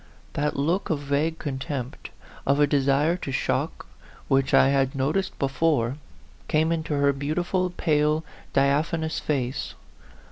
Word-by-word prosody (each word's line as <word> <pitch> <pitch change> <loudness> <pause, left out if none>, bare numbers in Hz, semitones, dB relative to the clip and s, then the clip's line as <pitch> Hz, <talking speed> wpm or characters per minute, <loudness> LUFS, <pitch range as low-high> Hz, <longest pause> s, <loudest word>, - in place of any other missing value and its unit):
That 150 +1 -1
look 165 +8 0
of 160 - +1
vague 145 +3 -1
contempt,* 135 -3 -5 0.4
of 140 +1 +3
a 145 - +6
desire 145 +3 +2
to 140 - -5
shock, 130 - -1 0.4
which 135 0 +2
I - - +6
had 135 -1 +1
noticed 155 +9 -1
before, 135 -2 +1 0.5
came 160 +2 +2
into 160 -2 -1
her 140 0 +3
beautiful, 175 +6 -1
pale, 155 -2 +1 0.3
diaphanous 155 +4 +1
face. 135 -3 -2
145 Hz, 130 wpm, -25 LUFS, 135-160 Hz, 0.5 s, a